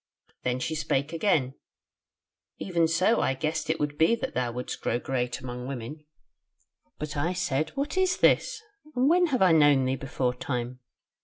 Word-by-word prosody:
Then 125 Hz, 0 st, -1 dB
she 130 Hz, +5 st, -3 dB
spake 150 Hz, -1 st, -1 dB
again: 160 Hz, -7 st, +1 dB, 1.0 s
'Even 170 Hz, -3 st, +1 dB
so 185 Hz, +8 st, +2 dB
I 135 Hz, -, +1 dB
guessed 155 Hz, +4 st, -2 dB
it 160 Hz, -, 0 dB
would 145 Hz, 0 st, -2 dB
be 165 Hz, +9 st, +5 dB
that 260 Hz, +3 st, -5 dB
thou 125 Hz, -1 st, -1 dB
wouldst 125 Hz, +1 st, -5 dB
grow 120 Hz, -, 0 dB
great 125 Hz, -1 st, -2 dB
amongst 125 Hz, -1 st, -6 dB
women.' 140 Hz, +4 st, -7 dB, 0.9 s
"But 150 Hz, 0 st, -5 dB
I 160 Hz, +5 st, 0 dB
said, 160 Hz, -4 st, -1 dB
'What 290 Hz, +6 st, -1 dB
is 370 Hz, -1 st, +2 dB
this? -, -, +3 dB, 0.4 s
and 250 Hz, +2 st, +3 dB
when 350 Hz, +3 st, +4 dB
have 255 Hz, -9 st, +2 dB
I 185 Hz, -, +5 dB
known 145 Hz, -4 st, +5 dB
thee 130 Hz, +1 st, 0 dB
before 130 Hz, -2 st, -2 dB
time?' 125 Hz, 0 st, -4 dB
150 Hz, 170 wpm, -27 LUFS, 130-180 Hz, 1.0 s, be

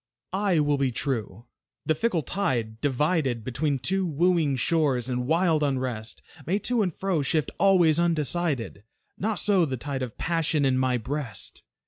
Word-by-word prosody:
I 190 Hz, -4 st, +2 dB
will 145 Hz, -1 st, +2 dB
be 135 Hz, -2 st, +1 dB
true. 115 Hz, -4 st, -3 dB, 0.4 s
The 160 Hz, -, +3 dB
fickle 175 Hz, -2 st, 0 dB
tide, 120 Hz, -, -2 dB
divided 145 Hz, -3 st, 0 dB
Between 140 Hz, +4 st, -1 dB
two 190 Hz, +8 st, 0 dB
wooing 165 Hz, -3 st, +2 dB
shores, 130 Hz, -3 st, +1 dB
in 125 Hz, 0 st, -2 dB
wild 165 Hz, 0 st, +2 dB
unrest 130 Hz, -6 st, -2 dB, 0.2 s
May 190 Hz, +4 st, +2 dB
to 235 Hz, +3 st, 0 dB
and 185 Hz, -4 st, +1 dB
fro 185 Hz, -1 st, -1 dB
shift 150 Hz, +2 st, 0 dB
always 175 Hz, -5 st, +4 dB
undecided; 160 Hz, -, -1 dB, 0.4 s
Not 215 Hz, +2 st, 0 dB
so 195 Hz, -3 st, +3 dB
the 135 Hz, -5 st, -1 dB
tide 135 Hz, +1 st, -4 dB
of 125 Hz, -4 st, -5 dB
Passion 160 Hz, -3 st, 0 dB
in 130 Hz, -1 st, +3 dB
my 130 Hz, -1 st, +2 dB
breast. 130 Hz, 0 st, -4 dB
150 Hz, 155 wpm, -26 LUFS, 130-175 Hz, 0.4 s, always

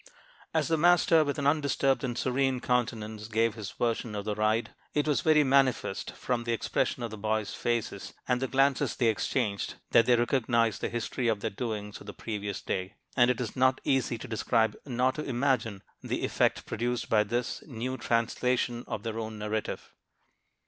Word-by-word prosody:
As -, -, +1 dB
the 165 Hz, -1 st, +2 dB
master, 170 Hz, -1 st, +5 dB
with 145 Hz, 0 st, -2 dB
an 140 Hz, -, -2 dB
undisturbed 140 Hz, -2 st, +2 dB
and 120 Hz, -2 st, -2 dB
serene 130 Hz, 0 st, +1 dB
countenance, 110 Hz, -4 st, -1 dB
gave 115 Hz, 0 st, +1 dB
this 105 Hz, -3 st, -6 dB
version 115 Hz, 0 st, -2 dB
of 100 Hz, -1 st, -4 dB
the 105 Hz, -, -1 dB
ride, 110 Hz, +2 st, 0 dB, 0.2 s
it 150 Hz, 0 st, +1 dB
was 150 Hz, -, +2 dB
very 155 Hz, -1 st, +5 dB
manifest 130 Hz, -7 st, +1 dB
from 120 Hz, -2 st, -2 dB
the 120 Hz, 0 st, -1 dB
expression 120 Hz, +1 st, -1 dB
of 115 Hz, -, -4 dB
the 110 Hz, -, -7 dB
boys' 110 Hz, 0 st, -1 dB
faces, 120 Hz, -2 st, -2 dB, 0.2 s
and 125 Hz, 0 st, +1 dB
the 135 Hz, -, 0 dB
glances 135 Hz, +1 st, +2 dB
they 120 Hz, -3 st, +3 dB
exchanged, 105 Hz, -2 st, -1 dB, 0.2 s
that 115 Hz, -, +5 dB
they 125 Hz, -, +6 dB
recognized 120 Hz, -2 st, +1 dB
the -, -, -1 dB
history 120 Hz, +1 st, -2 dB
of 110 Hz, -3 st, +1 dB
their 110 Hz, -, -2 dB
doings 105 Hz, -2 st, -4 dB
of -, -, -12 dB
the 100 Hz, -, -7 dB
previous 105 Hz, -3 st, -4 dB
day; 95 Hz, +1 st, -3 dB, 0.2 s
and 120 Hz, -1 st, +5 dB
it 125 Hz, -, +1 dB
is 120 Hz, -4 st, -4 dB
not 130 Hz, 0 st, +3 dB
easy 130 Hz, -3 st, +1 dB
to -, -, -8 dB
describe 110 Hz, 0 st, +1 dB
nor 125 Hz, 0 st, +2 dB
to 150 Hz, -, -5 dB
imagine 120 Hz, -6 st, 0 dB, 0.2 s
the -, -, -2 dB
effect -, -, +1 dB
produced 120 Hz, +2 st, -2 dB
by 105 Hz, -2 st, +4 dB
this 120 Hz, +3 st, -2 dB
new 130 Hz, -1 st, -4 dB
translation 120 Hz, 0 st, 0 dB
of 105 Hz, -, -4 dB
their 115 Hz, -1 st, -3 dB
own 110 Hz, -1 st, -5 dB
narrative. 105 Hz, 0 st, -4 dB
120 Hz, 185 wpm, -29 LUFS, 110-130 Hz, 0.2 s, they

